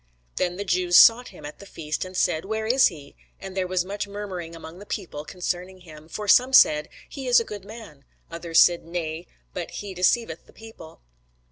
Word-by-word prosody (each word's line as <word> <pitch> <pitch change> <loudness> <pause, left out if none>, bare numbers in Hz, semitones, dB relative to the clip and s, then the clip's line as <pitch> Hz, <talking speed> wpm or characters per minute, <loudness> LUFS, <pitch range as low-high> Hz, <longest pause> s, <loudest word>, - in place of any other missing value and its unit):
Then 180 -1 -1
the 200 - -4
Jews 180 -1 +3
sought 240 +2 +7
him 180 - -13
at 150 - -10
the 200 - -12
feast, 155 -5 -5
and 185 0 -8
said, 165 -4 +1
Where 220 +2 -3
is 255 +4 +4
he? 145 -6 -10 0.2
And 190 -1 -9
there 185 -1 -1
was 180 -1 -1
much 205 +2 -5
murmuring 190 -5 -7
among 165 +2 -11
the 205 - -11
people 165 -7 -6
concerning 180 +2 -5
him: 155 -2 -14
for 210 +4 -6
some 250 +6 +4
said, 150 -11 +5 0.2
He 270 -2 -8
is 245 0 +6
a - - -2
good 205 -2 -8
man: 205 -10 -12 0.3
others 170 0 +1
said, 175 -1 +5
Nay; 165 0 -5 0.3
but - - -5
he 200 -2 -7
deceiveth 180 -1 0
the - - -20
people. 220 - -14
185 Hz, 205 wpm, -24 LUFS, 165-205 Hz, 0.3 s, sought